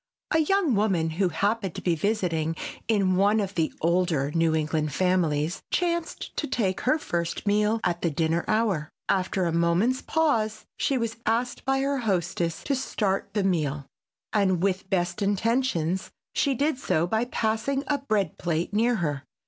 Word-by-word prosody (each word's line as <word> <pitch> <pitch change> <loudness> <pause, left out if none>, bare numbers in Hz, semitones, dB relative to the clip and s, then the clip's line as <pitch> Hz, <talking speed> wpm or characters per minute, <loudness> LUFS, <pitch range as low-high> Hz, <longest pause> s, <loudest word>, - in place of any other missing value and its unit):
A 320 - +4
young 340 -2 +2
woman 190 -6 +1
who 180 +3 +1
happened 200 +3 -1
to - - -5
be 175 - +2
visiting 165 -3 0 0.3
in 195 -4 +2
one 205 +3 +4
of 200 -2 -2
the 165 -4 0
older 170 -4 +1
New 165 0 +2
England 155 -1 -1
families 170 -2 +1
chanced 340 -1 -2
to 300 - -1
take 195 -7 -1
her 260 +5 +3
first 170 - -3
meal 210 +2 +2
at 175 -1 0
the 170 - +1
dinner 165 +2 0
hour. 205 -9 +1 0.2
After 185 -1 +1
a 170 - +1
moment's 170 +10 +2
pause 230 -10 0
she 275 - 0
was 230 -2 -2
asked 235 +3 0
by 270 0 +2
her 275 0 0
hostess 175 -6 -1
to 285 - 0
start 210 -7 -1
the 205 - +1
meal, 150 -7 0 0.5
and 190 -4 +2
with 190 -1 0
best 175 0 0
intentions 200 -4 0 0.2
she 280 -2 +1
did 285 +1 0
so 165 -10 +1
by 220 +6 0
passing 230 +4 -1
a 290 -1 0
bread 215 -7 -1
plate 170 +2 -1
near 235 +3 +3
her. 150 -8 -2
195 Hz, 165 wpm, -26 LUFS, 170-230 Hz, 0.5 s, A